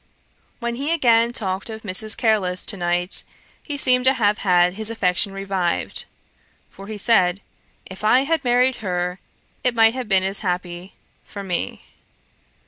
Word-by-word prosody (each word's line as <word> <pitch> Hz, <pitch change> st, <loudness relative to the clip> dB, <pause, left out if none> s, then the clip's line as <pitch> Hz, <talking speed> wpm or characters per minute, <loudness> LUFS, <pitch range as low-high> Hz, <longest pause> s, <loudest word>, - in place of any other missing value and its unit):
When 235 Hz, -1 st, -4 dB
he 285 Hz, +4 st, -2 dB
again 235 Hz, -7 st, +3 dB
talked 195 Hz, -3 st, -3 dB
of 220 Hz, 0 st, -8 dB
Mrs. 215 Hz, +2 st, +1 dB
Careless 200 Hz, -6 st, 0 dB
to -, -, 0 dB
night, 175 Hz, 0 st, -1 dB, 0.4 s
he 290 Hz, -2 st, -5 dB
seemed 250 Hz, -2 st, +4 dB
to 265 Hz, +1 st, +5 dB
have 210 Hz, -2 st, +1 dB
had 180 Hz, -2 st, +3 dB
his 220 Hz, +2 st, -1 dB
affection 195 Hz, -3 st, 0 dB
revived; 195 Hz, -3 st, -2 dB, 0.7 s
for 195 Hz, -, -12 dB
he 215 Hz, 0 st, -6 dB
said, 195 Hz, -4 st, +2 dB, 0.5 s
'If 190 Hz, +2 st, -11 dB
I 245 Hz, +5 st, +4 dB
had 310 Hz, +2 st, -1 dB
married 250 Hz, 0 st, +2 dB
her, 180 Hz, -3 st, -3 dB, 0.4 s
it 250 Hz, -1 st, +1 dB
might 225 Hz, 0 st, +5 dB
have 255 Hz, -2 st, -5 dB
been 190 Hz, -2 st, +4 dB
as 195 Hz, +1 st, +1 dB
happy 180 Hz, 0 st, -4 dB, 0.3 s
for 200 Hz, -, -9 dB
me. 175 Hz, -, -3 dB
205 Hz, 155 wpm, -21 LUFS, 185-235 Hz, 0.7 s, to